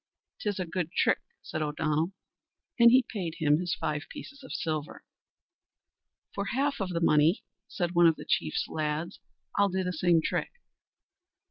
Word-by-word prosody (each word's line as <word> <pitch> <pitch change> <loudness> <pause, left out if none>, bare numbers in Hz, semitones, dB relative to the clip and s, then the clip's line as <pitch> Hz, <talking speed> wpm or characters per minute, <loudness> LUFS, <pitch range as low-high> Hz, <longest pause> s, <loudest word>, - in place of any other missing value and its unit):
"'Tis 205 -2 -2
a 185 - -1
good 170 0 -3
trick," - - +2 0.2
said 155 - -4
O'Donnell; 155 +2 0 0.7
and 235 0 +9
he 255 +1 +5
paid 175 -7 -4
him 150 -2 +3
his 175 -1 -1
five 150 0 -3
pieces 280 +1 -10
of 260 - -10
silver. 155 -1 -3 1.3
"For 200 - -2
half 275 +6 0
the 185 -4 -1
money," 155 +2 +4 0.2
said 175 -3 -2
one 170 -1 +6
of 165 - +4
the - - -10
chief's 80 -2 0
lads, 155 +3 -3 0.4
"I'll 200 0 +5
do 190 0 -1
the 180 0 -2
same 170 0 +3
trick." - - -2
170 Hz, 155 wpm, -29 LUFS, 155-195 Hz, 1.3 s, and